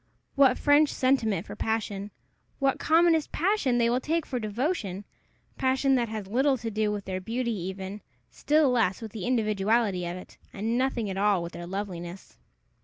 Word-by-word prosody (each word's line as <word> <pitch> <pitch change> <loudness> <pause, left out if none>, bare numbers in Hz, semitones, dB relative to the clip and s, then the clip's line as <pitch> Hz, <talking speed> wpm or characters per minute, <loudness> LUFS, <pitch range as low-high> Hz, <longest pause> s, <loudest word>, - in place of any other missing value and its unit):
what 270 -2 +5
French 290 +1 +4
sentiment 225 -8 +1
for - - -8
passion! 210 -2 -2 0.5
what 275 -1 +1
commonest 325 -1 +3
passion 340 - +1
they 235 -1 +3
will 240 +2 +2
take 325 +4 -1
for 250 - -3
devotion! 215 - -2 0.5
passion 265 +1 +2
that 240 -3 +1
has 215 -2 -5
little 265 +7 +2
to 225 -1 -5
do 215 0 0
with 205 -1 -4
their 185 0 -4
beauty 235 +4 -2
even, 190 +1 -5 0.3
still 300 -2 +2
less 225 -6 +1
with 225 -2 -7
the 200 -4 -5
individuality 215 -4 +1
of 175 +1 -4
it, 185 - -13
and 220 +4 -2
nothing 255 -3 0
at 190 -1 -4
all 200 -3 +2
with 170 - -7
their 175 0 -7
loveliness! 185 -2 -6
225 Hz, 175 wpm, -27 LUFS, 195-265 Hz, 0.5 s, what